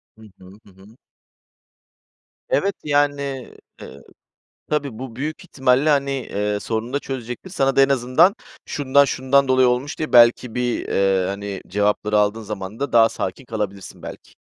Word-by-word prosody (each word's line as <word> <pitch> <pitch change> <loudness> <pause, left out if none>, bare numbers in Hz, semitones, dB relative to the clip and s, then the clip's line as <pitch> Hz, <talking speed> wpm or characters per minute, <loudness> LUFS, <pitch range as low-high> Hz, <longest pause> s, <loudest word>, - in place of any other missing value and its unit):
Hı 110 - -20 0.2
hı, 95 - -16 0.2
Hı - - -18
hı. 100 +5 -19 1.5
Evet, 200 - +1
yani, 145 -1 +1 0.6
eee, 70 - -11 0.7
tabii, 140 -7 -2
bu 130 -3 -8
büyük 150 +4 -5
ihtimalle, 130 +3 +2
hani, 140 -1 +1
eee, 105 -6 -2
sorunu 115 +2 -3
da 140 - +1
çözecektir. 130 +6 -7
Sana 135 -7 0
da - - +6
en 135 - +4
azından 140 - +3 0.3
"Şundan, 140 0 +3
şundan 135 0 +1
dolayı 130 -1 +4
olmuş." 125 +5 -2
diye 155 - -4
belki 120 0 +5
bir, 125 -1 -2
eee, 95 -1 +1
hani, 100 0 -5
cevapları 105 +2 +1
aldığın 105 +2 +1
zaman 105 +1 -7
da 140 - -3
daha 115 -1 +6
sakin 95 +4 -5
kalabilirsin 105 -4 -6
belki. - - -10
125 Hz, 155 wpm, -21 LUFS, 105-140 Hz, 1.5 s, da